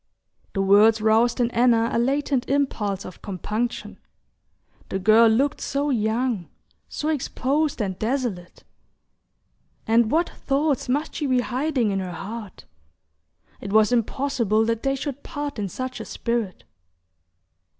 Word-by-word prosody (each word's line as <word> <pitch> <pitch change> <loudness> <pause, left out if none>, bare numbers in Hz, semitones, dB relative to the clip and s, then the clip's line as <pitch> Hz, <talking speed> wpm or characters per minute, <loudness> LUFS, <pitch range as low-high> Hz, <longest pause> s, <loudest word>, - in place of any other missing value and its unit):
The 195 - 0
words 210 +3 +5
roused 220 +3 +3
in 240 -1 +1
Anna 235 -1 +3
a - - +2
latent 270 +1 0
impulse 220 -9 -1
of 185 - -10
compunction. 215 +5 -4 0.9
The - - -2
girl 220 +4 +5
looked 270 +6 +1
so 280 +1 -1
young, 225 -3 -1 0.4
so 300 - -3
exposed 295 0 -1
and 190 -2 -4
desolate! 220 -7 -3 1.2
And 225 0 +3
what 330 +6 +2
thoughts 280 -2 -1
must 290 +5 -1
she 295 - -2
be 255 -1 +2
hiding 255 -3 0
in 195 - -1
her 185 -2 -5
heart! 205 +2 -8 0.9
It 200 - -6
was 215 +1 +4
impossible 235 -2 +1
that 230 0 -1
they 270 0 0
should 280 0 -5
part 290 -4 -5
in 200 -2 -2
such 255 +7 -5
a - - -6
spirit. 230 -5 -3
235 Hz, 135 wpm, -24 LUFS, 215-275 Hz, 1.2 s, words